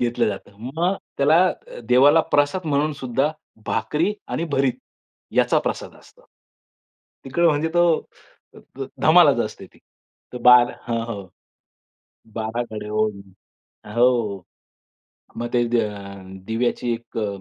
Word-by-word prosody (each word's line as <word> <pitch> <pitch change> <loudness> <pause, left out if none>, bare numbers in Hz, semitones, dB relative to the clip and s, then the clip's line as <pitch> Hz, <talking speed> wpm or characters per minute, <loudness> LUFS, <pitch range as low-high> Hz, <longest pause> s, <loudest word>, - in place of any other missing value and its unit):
घेतलं 120 -1 +1
जातं. 100 0 -7 0.2
मग 175 +3 +1 0.2
त्याला 150 +4 +5
अ, - - -8
देवाला 140 +6 +6
प्रसाद 145 +5 +2
म्हणून 150 +1 +1
सुद्धा 130 +4 0 0.4
भाकरी 150 - 0 0.2
आणि 165 - -2
भरीत 130 -2 +1 0.6
याचा - - +4
प्रसाद - - -4
असतो. - - -21 1.0
तिकडे 170 +6 +1
म्हणजे 155 0 +2
तो 175 - +5 1.0
ध - - -3 0.2
धमालच - - +6
असते - - -9
ती. - - -24 0.5
तर 125 - -5
12 125 -1 +7
हां, 115 -1 -2
हो, 105 -4 -5 1.1
12 110 +2 -2
गाड्या 105 -1 -6
ओढणं 105 -3 -2 0.6
हो, 120 -5 +2 0.9
मग 120 - -3
ते 120 -1 +3
दे 120 0 +2 0.7
दिव्याची 120 +1 -1
एक 115 0 -9
अ, 105 - -1
120 Hz, 125 wpm, -22 LUFS, 115-145 Hz, 1.1 s, 12